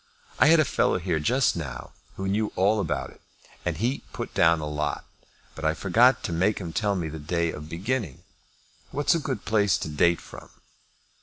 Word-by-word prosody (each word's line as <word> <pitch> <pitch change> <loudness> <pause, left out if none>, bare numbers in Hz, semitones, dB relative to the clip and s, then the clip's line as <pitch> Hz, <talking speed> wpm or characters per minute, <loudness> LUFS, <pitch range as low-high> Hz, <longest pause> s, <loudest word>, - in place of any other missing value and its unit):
I - - +6
had 165 +1 +6
a 155 - +4
fellow - - +1
here 85 -3 -1
just 125 - +2
now 75 -7 -6 0.2
who 95 - -4
knew 105 +2 0
all 100 +4 +3
about 80 -7 -2
it, - - -20 0.4
and 85 -3 -2
he 120 - -1
put - - -5
down 85 -1 +4
a 75 - -4
lot; 75 0 -3 0.5
but 80 - -10
I 80 +1 +1
forgot 115 +9 +3
to - - -3
make 95 +6 +1
him 85 -4 -6
tell 105 -2 0
me 85 -4 -2
the 80 0 -7
day 85 +2 -1
of 75 +1 -9
beginning. 95 - -3 0.7
What's 145 +5 +1
a 165 - +1
good 135 -4 -4
place 105 -4 +2
to - - -5
date 85 +3 +2
from?" - - -12
90 Hz, 200 wpm, -26 LUFS, 80-110 Hz, 0.7 s, I